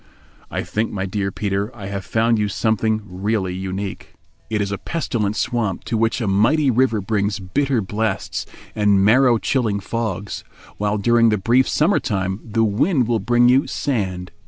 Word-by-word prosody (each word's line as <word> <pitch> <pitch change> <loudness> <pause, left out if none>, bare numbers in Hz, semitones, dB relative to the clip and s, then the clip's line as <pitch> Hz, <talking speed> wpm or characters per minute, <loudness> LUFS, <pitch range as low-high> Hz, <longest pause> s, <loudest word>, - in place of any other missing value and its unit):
"I - - -3
think, 110 +2 -2
my 95 -1 -3
dear 100 0 -2
Peter, 100 +1 -2
I 105 -4 -8
have 100 0 -4
found 115 +3 +1
you 105 - +1
something 110 +1 0
really 95 0 -2
unique. 95 +1 -5 0.3
It 110 -1 -1
is 100 -1 -1
a 100 - -3
pestilent 115 -11 -2
swamp 115 -6 -1
to - - -3
which 115 +1 +1
a 115 - -2
mighty 130 +9 +3
river 120 -3 +2
brings 100 +1 -1
bitter 120 +6 0
blasts 110 +3 -2 0.3
and 100 -2 +3
marrow 120 +2 +5
chilling 110 -4 0
fogs, 105 -1 -4 0.3
while 105 +1 0
during 115 +2 +4
the 105 - +2
brief 120 +7 +2
summer 165 +7 +2
time 95 -4 -2
the 115 0 0
wind 125 - +2
will 115 -2 +1
bring 120 +3 +3
you 130 +3 +4
sand. 95 -9 -2
110 Hz, 170 wpm, -21 LUFS, 100-120 Hz, 0.3 s, marrow